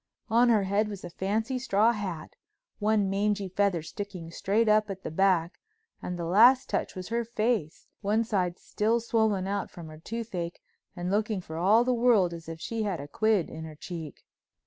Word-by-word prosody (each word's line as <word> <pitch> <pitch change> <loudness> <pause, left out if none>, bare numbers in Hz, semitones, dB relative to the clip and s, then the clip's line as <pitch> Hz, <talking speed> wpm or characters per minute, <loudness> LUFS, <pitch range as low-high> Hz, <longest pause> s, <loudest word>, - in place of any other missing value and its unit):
On 240 +2 +5
her 215 -4 +4
head 200 +3 +1
was 205 -3 -7
a 175 - -7
fancy 220 +8 -1
straw 225 -2 +3
hat 190 -8 -5
with - - -40
one 210 -1 +2
mangy 200 0 0
feather 185 -3 0
sticking 180 -1 -7
straight 210 +6 +1
up 215 0 +4
at 190 -1 -6
the - - -5
back, 180 -1 +2 0.4
and 180 - -4
the 170 - -3
last 235 +9 +6
touch - - -1
was 185 -1 -6
her 235 +1 0
face, 220 -8 -1 0.2
one 215 +2 +1
side 185 -6 -1
still 225 +3 0
swollen 220 -4 +1
out 200 0 -2
from 170 -3 -10
her 155 0 -11
toothache, 185 -4 -5 0.4
and 175 0 -3
looking 215 0 0
for 160 -3 -9
all 200 +8 +4
the 250 +1 +1
world 230 -7 +3
as 165 -1 -9
if 165 0 -7
she 225 +6 -3
had 200 -5 -1
a 140 - -7
quid 215 +2 +1
in 160 0 -8
her 160 -1 -8
cheek. 160 -2 -8
200 Hz, 195 wpm, -28 LUFS, 175-220 Hz, 0.4 s, last